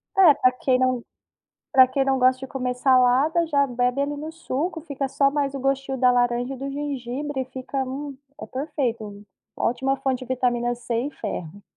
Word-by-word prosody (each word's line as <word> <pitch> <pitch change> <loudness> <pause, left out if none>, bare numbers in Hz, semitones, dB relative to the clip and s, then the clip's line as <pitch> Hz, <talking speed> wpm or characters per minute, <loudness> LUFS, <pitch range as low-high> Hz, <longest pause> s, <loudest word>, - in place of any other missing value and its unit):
É, 365 -6 +8
pra 255 - +3
quem 255 0 +1
não 255 -2 +1 0.7
pra 260 -2 +7
quem 265 +1 0
não 270 -1 +1
gosta 255 +1 +3
de 265 - -6
comer 250 -2 -3
salada, 265 +6 +3
já 285 -3 +3
bebe, 250 +1 0
ali, 290 +1 -1
no 310 +2 -6
suco. 330 +1 -3
Fica, 280 -3 -4
só, 275 +1 +2
mais 280 -1 -1
o 275 - -4
gostinho 270 0 -1
da 250 0 +5
laranja 245 +1 +1
e - - -8
do 275 +2 -5
gengibre 275 0 -3
e - - -5
fica, 260 +1 -4
hum, 275 +1 -6 0.2
é - - -6
perfeito. 235 -7 -3 0.3
Ótima 265 +3 0
fonte 260 -1 -1
de - - -6
vitamina 245 -1 0
C 240 0 -5
e - - -4
ferro. 200 - -6
260 Hz, 195 wpm, -24 LUFS, 250-280 Hz, 0.7 s, É